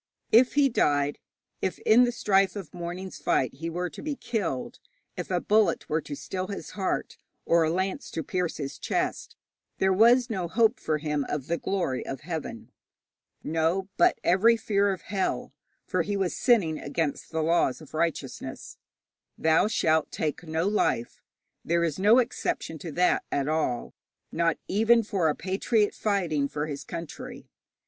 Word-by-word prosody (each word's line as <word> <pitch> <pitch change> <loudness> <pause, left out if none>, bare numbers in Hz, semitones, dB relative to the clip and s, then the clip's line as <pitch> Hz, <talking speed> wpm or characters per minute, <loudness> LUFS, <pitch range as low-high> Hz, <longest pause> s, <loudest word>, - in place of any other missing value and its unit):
If 245 +4 +5
he 285 -1 +5
died, 145 - +1 0.4
if 190 - -1
in 240 +3 +5
the 245 - 0
strife 195 -4 +2
of 190 -7 -7
the - - -12
morning's 180 +2 -6
fight 130 - +1
he 165 +5 -5
were 175 +2 -2
to - - -9
be 300 -1 -3
killed, 195 - -3 0.4
if - - -5
a - - +1
bullet 215 0 +2
were 160 +1 +1
to 145 - -7
still 185 +5 -4
his 200 - -6
heart, 195 -2 -2 0.3
or 170 0 +4
a 160 - +2
lance 185 +3 -2
to 160 - -1
pierce 180 0 -2
his 140 -2 -5
chest, - - -2 0.4
there 190 0 +3
was 235 +5 +5
no 190 -7 -2
hope 225 +6 +2
for 155 -1 0
him 150 -1 -1
of 145 -3 -2
the 170 +3 -1
glory 175 -10 -1
of 135 - -6
heaven. 155 -8 -6 0.7
No, 165 +5 0
but - - +4
every 220 +7 +4
fear 200 -2 +1
of 190 - -5
hell, 195 0 -2 0.3
for 185 -3 0
he 200 +4 -2
was 190 -2 -1
sinning 195 -11 +2
against 160 -4 -3
the 160 -1 -1
laws 165 -5 +2
of 155 - -14
righteousness 165 0 -3 0.6
'Thou 160 +4 +3
shalt 160 -7 +1
take 155 -2 -2
no 160 +1 -1
life.' 200 - 0 0.4
There 170 +1 +1
is 165 0 -1
no 210 +5 +6
exception 235 -9 -1
to 165 - -6
that 180 +3 +2
at 140 -1 0
all, 150 -6 -1 0.4
not 165 0 +1
even 225 +4 +4
for 195 -6 0
a 150 - 0
patriot 205 +4 0
fighting 175 -9 0
for 150 +1 -3
his 145 -2 -5
country. 170 -1 -8
175 Hz, 170 wpm, -27 LUFS, 155-205 Hz, 0.7 s, no